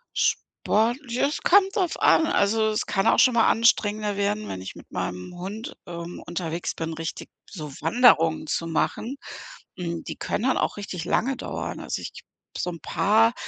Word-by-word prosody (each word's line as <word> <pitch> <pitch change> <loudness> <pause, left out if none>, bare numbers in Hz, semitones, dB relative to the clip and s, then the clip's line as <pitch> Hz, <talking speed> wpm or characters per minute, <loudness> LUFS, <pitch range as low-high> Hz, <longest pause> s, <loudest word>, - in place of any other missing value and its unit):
Sport 225 +4 +1
ja 240 +4 +1
es 295 - -3
kommt 390 +2 +4
drauf 370 -6 0
an. 320 - +5
Also, 220 -1 +2
es 215 - -1
kann 195 -1 0
auch - - +4
schon 255 - +6
mal 230 -1 +4
anstrengender 210 -2 +2
werden, 205 +1 -1
wenn 95 - -5
ich 95 - -8
mit - - -14
meinem 90 - -4
Hund, 210 - -6
ähm, 170 0 -7
unterwegs 170 -1 -3
bin, 165 0 -4
richtig 165 0 -6 0.2
so 155 -7 -7
Wanderungen 165 -11 +4
zu 165 +2 -1
machen. 230 - -1 0.6
Hm, 170 -2 -4
die - - -6
können 210 - -3
dann 265 - +2
auch - - -1
richtig 185 -5 -5
lange 255 +8 +1
dauern. - - -5
Also, - - -4
ich - - -6 0.5
so 180 - -2
'n 170 - -8
paar, 220 +3 +3
205 Hz, 180 wpm, -25 LUFS, 170-230 Hz, 0.6 s, schon